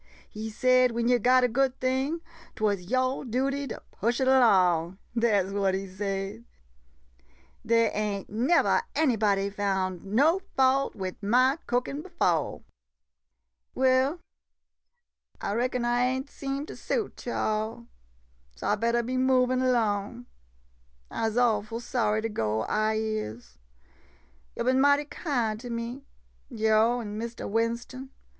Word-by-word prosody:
He 220 +1 -6
said 255 +2 +3
when 235 0 0
yo' 245 0 +4
got 255 +3 +4
a - - +5
good 260 +2 0
thing 265 +6 -1 0.2
— - - -22
't - - -7
was 200 -4 +1
yo' 255 +1 0
duty 275 +3 -1
to - - -7
push 235 +3 -1
it 265 - +2
'long. 185 -9 +4 0.2
Dat 220 -5 +2
's - - -7
what 195 -2 +1
he 195 +1 -3
said. 195 +3 -4 1.2
Dey 230 0 +3
ain't 205 -2 -2
nevah 250 +11 +2
any 290 -5 +3
body 200 -2 +1
foun' 190 -3 -1
no 280 - +3 0.2
fault 265 +1 +3
wid 185 -2 -5
ma 255 +7 +3
cookin' 250 +4 -1
befo'. 350 0 -1 1.1
Well, 265 +5 +2 1.2
I 200 - -3
reckon 245 +1 -1
I 240 0 +1
ain' 260 +1 -1
seem 275 0 -5
to - - -9
suit 435 - -4
yo' 240 - -2
all 215 +1 -1
■ 235 -1 -16 0.3
— - - -37
so 60 - -4
I - - +3
bettah 235 +2 +1
be 255 +2 -2
movin' 255 0 +2
'long. 220 0 -1 0.9
I 225 - -1
'se 220 - -5
awful 225 -2 +1
sorry 220 -3 0
to 225 - -1
go, 110 - -1
I 215 - 0
is. 170 - -4 1.0
Yo' - - -2
bin 260 +2 +3
mighty 285 +1 +4
kind 245 -8 -2
to 245 +1 -8
me, 235 +3 -4 0.5
yo' 220 0 +2
an' 210 -1 -6
Mistah 235 +1 -5
Winston. 235 +4 -2
235 Hz, 150 wpm, -27 LUFS, 210-255 Hz, 1.2 s, a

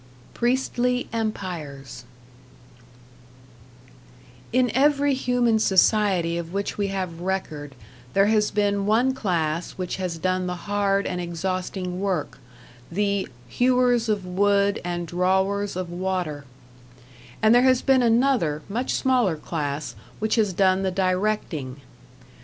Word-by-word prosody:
#Priestly 250 0 0
Empires# 165 - -5 2.5
In 250 0 +2
every 285 +1 +3
human 245 -3 +1
society 190 -4 +3
of 170 0 -7
which 200 +1 -3
we 200 -1 -1
have 185 -4 -4
record 155 -7 -4 0.4
there 195 0 +5
has 210 0 +2
been 200 -1 0
one 240 +5 +3
class 170 -8 -1
which 185 -2 -4
has 180 -3 -3
done 185 +2 -1
the 180 - -2
hard 200 -1 +1
and 180 - -2
exhausting 180 +1 -3
work, 190 -6 -2 0.5
the 200 +1 0 0.2
"hewers 245 - +2
of 205 -3 0
wood 200 +2 +2
and 175 0 -3
drawers 190 +4 0
of 180 -1 -4
water"; 175 -5 -3 0.9
and 220 +1 +5
there 245 - +6
has 255 -1 +3
been 265 -1 +4
another, 230 - +2
much 240 +6 -2
smaller 245 -11 +2
class 145 -4 -4 0.2
which 220 +1 -1
has 215 -4 +2
done 190 +1 +2
the 190 - 0
directing. 185 -7 -1
195 Hz, 120 wpm, -24 LUFS, 175-220 Hz, 2.5 s, there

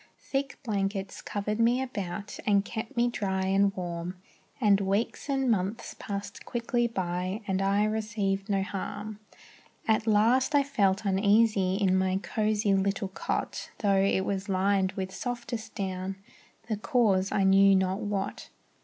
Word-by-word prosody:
Thick 275 0 -1
blankets 195 -4 -2
covered 210 +1 -3
me 235 +2 +4
about, 200 -6 -5
And 200 -1 +4
kept 230 +4 -6
me 240 0 +4
dry 190 -5 -1
and 195 +1 +3
warm, 175 0 -4 0.4
And 205 -4 +4
weeks 200 +8 -1
and 270 -3 +2
months 200 +1 -2
passed 200 -1 -5
quickly 240 0 0
by 185 0 -3
And 190 -1 0
I 200 +1 +2
received 210 -2 -1
no 195 -1 +1
harm. 205 +2 -5 0.7
At 220 0 +2
last 235 +7 +3
I 285 - +5
felt 200 -7 +1
uneasy 200 -1 +3
in 195 -2 +2
My 190 0 +2
cosy 210 0 0
little 195 0 0
cot, 190 - -3
Tho' 200 -3 +2
it 195 -1 +2
was 200 +1 -2
lined 190 0 +2
with 190 0 -4
softest 235 -3 -5
down. 190 -1 -3 0.5
The 215 -2 -1
cause 200 -4 +2
I 195 - +2
knew 195 0 +6
not 190 +1 +1
what. 205 -2 -3
200 Hz, 145 wpm, -28 LUFS, 190-220 Hz, 0.7 s, knew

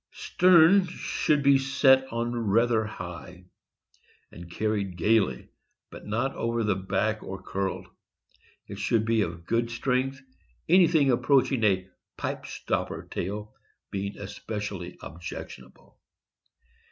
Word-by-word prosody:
Stern 180 +1 +5
should 150 -4 -1
be 140 -1 +5
set 135 -1 +3
on 120 +1 -2
rather 115 +1 +2
high, 90 -2 -8 0.9
and 85 0 -11
carried 100 -1 -2
gaily, 95 - +1 0.4
but - - -11
not 120 +6 -1
over 115 0 -1
the 105 -2 +1
back 100 +3 -1
or 95 0 -7
curled. 95 0 -3 0.8
It - - -9
should 110 -1 +1
be 115 -1 +2
of 85 -3 -4
good 115 +3 0
strength, 130 +3 -1 0.5
anything 165 -5 +5
approaching 130 -1 +2
a 95 -3 +2 0.3
"pipe - - -4
stopper" - - -3
tail 105 +3 -4 0.4
being 100 +1 -4
especially 100 -2 -6
objectionable. 75 -5 -10
110 Hz, 115 wpm, -27 LUFS, 95-130 Hz, 0.9 s, Stern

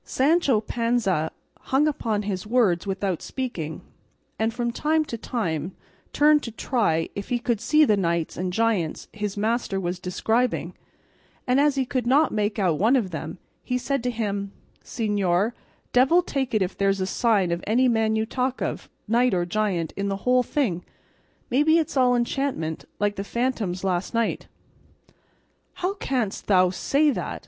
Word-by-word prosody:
Sancho 275 -4 +2
Panza 225 -9 0 0.4
hung 275 +3 +3
upon 220 -8 -1
his 200 -1 -4
words 210 -7 +2
without 190 -2 -2
speaking, 180 - -5 0.6
and 220 +1 +1
from 235 +1 -2
time 310 +5 +1
to 235 - -5
time 180 - -3 0.4
turned 300 0 +4
to 235 - -5
try 215 -8 0
if 200 - -6
he 245 - +1
could 235 -3 -1
see 305 +6 +4
the 215 - +3
knights 170 -4 -1
and 180 0 -2
giants 210 -6 0
his 210 -2 -4
master 220 -2 0
was 180 -1 -3
describing, 225 +7 -1 0.7
and 250 +1 +3
as 290 -1 +3
he 265 -1 0
could 250 -2 -2
not 285 +5 +4
make 210 0 -1
out 180 -7 +1
one 225 +7 +4
of 215 -8 0
them 160 +1 -5 0.2
he 250 - -1
said 275 +1 -1
to 250 - -1
him: 205 -4 -3 0.3
"Señor, 205 -2 0 0.4
devil 270 +8 +5
take 265 -7 -2
it 210 - +3
if 185 - -4
there's 195 0 +1
a 185 - 0
sign 200 -3 +1
of 170 +1 -2
any 245 +5 +3
man 225 -2 +2
you 220 0 +1
talk 255 +2 -2
of, - - -4 0.2
knight 235 0 +3
or 175 -1 0
giant, 180 -4 -1
in 200 0 -2
the 195 0 -4
whole 250 0 +4
thing; 225 - -1 0.7
maybe 300 +6 +4
it's 320 -3 -1
all 250 -2 +4
enchantment, 240 - -2
like 205 0 0
the 195 - -2
phantoms 215 -6 -2
last 185 +3 -1
night." 230 -1 -1 1.3
"How 370 +2 -2
canst 250 - -2
thou 185 -2 +4
say 285 +10 +2
that!" - - -4
220 Hz, 170 wpm, -24 LUFS, 190-255 Hz, 1.3 s, devil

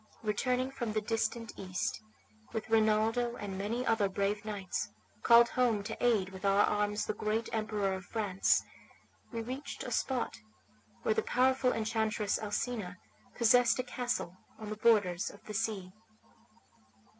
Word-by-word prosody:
Returning 250 +5 0
from 240 -5 -3
the 215 - 0
distant 225 +1 -2
East, 185 - -3 0.5
with 220 0 -4
Rinaldo 225 +2 +3
and 200 -4 -5
many 220 +6 -2
other 225 -4 +2
brave 200 +2 -1
knights, 195 - -3 0.3
called 235 0 +7
home 235 -5 +1
to 220 +3 -6
aid 215 -6 +3
with 190 0 -10
our 200 +1 +4
arms 210 0 0
the - - -1
great 215 +2 -1
Emperor 215 -3 0
of 190 0 -6
France, 205 -4 +1 0.7
we 230 -1 -3
reached 260 +5 -6
a - - -6
spot 260 -3 -1 0.6
where 220 - +3
the - - +1
powerful 260 0 +2
enchantress 220 -2 0
Alcina 205 -3 -3 0.4
possessed 240 0 +5
a 255 - 0
castle 245 -7 -3 0.2
on 215 -1 -7
the - - -2
borders 205 -6 +3
of 205 - -14
the 215 - -8
sea. 210 -4 -2
215 Hz, 145 wpm, -32 LUFS, 205-235 Hz, 0.7 s, called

